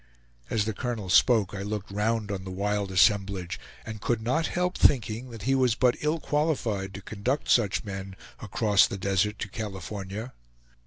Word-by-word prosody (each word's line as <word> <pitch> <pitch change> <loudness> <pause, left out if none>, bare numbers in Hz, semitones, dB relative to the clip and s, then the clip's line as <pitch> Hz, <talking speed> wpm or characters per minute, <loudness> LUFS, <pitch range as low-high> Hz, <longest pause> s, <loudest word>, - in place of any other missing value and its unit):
As 105 -2 +1
the 110 - -2
colonel 110 -4 -3
spoke, 110 -5 +4
I 100 - -4
looked 105 0 -4
round 105 +1 0
on 95 -1 -4
the 95 - -7
wild 100 +1 -1
assemblage, 95 -2 +2 0.3
and 110 -2 -7
could 120 0 0
not 130 +9 0
help 180 +1 -1
thinking 120 -2 +2
that 115 -4 -9
he 135 +4 +2
was 130 -4 +3
but 125 0 +3
ill 155 +2 0
qualified 120 -12 -1
to 100 - -8
conduct 120 +9 -2
such 105 -5 +3
men 95 -2 -6 0.2
across 105 -1 +3
the - - -5
desert 100 +2 0
to - - -4
California. 100 +2 -6
105 Hz, 170 wpm, -27 LUFS, 100-120 Hz, 0.3 s, spoke